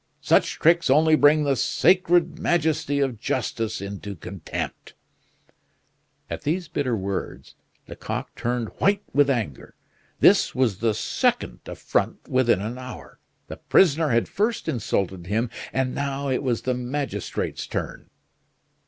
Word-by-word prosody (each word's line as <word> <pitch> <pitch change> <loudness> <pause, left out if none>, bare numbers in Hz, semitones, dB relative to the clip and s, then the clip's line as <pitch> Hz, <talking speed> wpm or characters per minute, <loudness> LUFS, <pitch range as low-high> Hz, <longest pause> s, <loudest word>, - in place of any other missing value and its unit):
Such - - +3
tricks 170 -1 +3
only 155 +3 +5
bring 150 0 +5
the 140 -2 +2
sacred 175 +4 +2
majesty 160 -3 +1
of 130 -5 -1
justice 115 -2 -2
into 100 0 -6
contempt!" 90 0 -6 1.3
At - - -5
these 165 +4 -1
bitter 140 -7 -1
words, 95 0 -5 0.3
Lecoq - - -5
turned 120 -2 -2
white 200 +1 +2
with 145 0 +4
anger. 110 - -3 0.4
This - - +5
was 115 -7 +1
the 110 -2 +1
second 60 - 0
affront - - -2
within 120 -7 +2
an 115 +5 -5
hour. 130 -1 -10 0.3
The - - -8
prisoner 160 -3 +3
had 115 -2 +2
first 215 +3 -1
insulted 95 -6 -2
him, 115 +4 -1 0.2
and 130 -1 -1
now 140 0 -2
it 130 - 0
was 125 -5 -1
the 130 - 0
magistrate's 130 +3 -3
turn. - - -5
130 Hz, 130 wpm, -24 LUFS, 115-150 Hz, 1.3 s, only